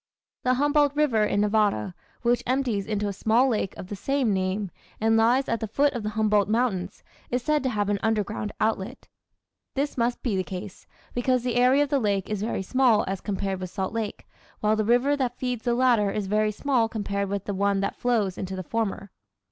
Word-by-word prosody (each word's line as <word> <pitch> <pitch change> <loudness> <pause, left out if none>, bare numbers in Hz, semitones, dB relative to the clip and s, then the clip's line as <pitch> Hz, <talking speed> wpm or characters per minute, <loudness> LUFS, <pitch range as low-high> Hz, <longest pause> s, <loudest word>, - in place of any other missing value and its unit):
The 255 0 +3
Humboldt 290 +1 +2
River 275 -8 +2
in 205 -1 +1
Nevada, 205 - +1 0.3
which 240 0 +2
empties 250 -6 0
into 210 -1 -1
a 200 - -2
small 225 +6 +3
lake 215 -6 -1
of - - -7
the 205 - -6
same 265 0 0
name, 190 +1 -1 0.3
and 225 +1 +3
lies 240 +4 +3
at 230 - 0
the 220 - -3
foot 280 +7 +2
of 240 - -3
the 210 - -2
Humboldt 210 -2 +3
Mountains, 220 -5 -1 0.3
is 250 0 -1
said 300 +2 +2
to 260 - 0
have 205 -4 -1
an 205 -1 0
underground 215 -1 -1
outlet. 220 +2 -2 0.7
This 280 -1 -1
must 235 +1 0
be 235 -6 0
the 185 - 0
case, 190 +1 -8 0.3
because 250 0 +1
the 250 -1 -1
area 255 +4 +5
of 290 - -4
the 280 - +2
lake 200 -4 -1
is 210 -2 -2
very 215 -3 -2
small 250 0 +3
as 195 0 -3
compared 195 -2 -2
with 185 -1 -5
Salt 190 +1 -3
Lake, 225 -2 -4 0.3
while 215 -2 +2
the 215 - 0
river 245 +6 +3
that 250 -3 -2
feeds 250 -3 -3
the 240 -1 +2
latter 240 -5 +3
is 205 0 -2
very 215 +2 +1
small 240 0 +1
compared 200 -3 -2
with 200 -1 -3
the 205 - -3
one 200 0 +1
that 200 - -2
flows 220 -7 0
into 190 0 -4
the 185 - -5
former. 200 -1 -3
220 Hz, 210 wpm, -26 LUFS, 200-250 Hz, 0.7 s, area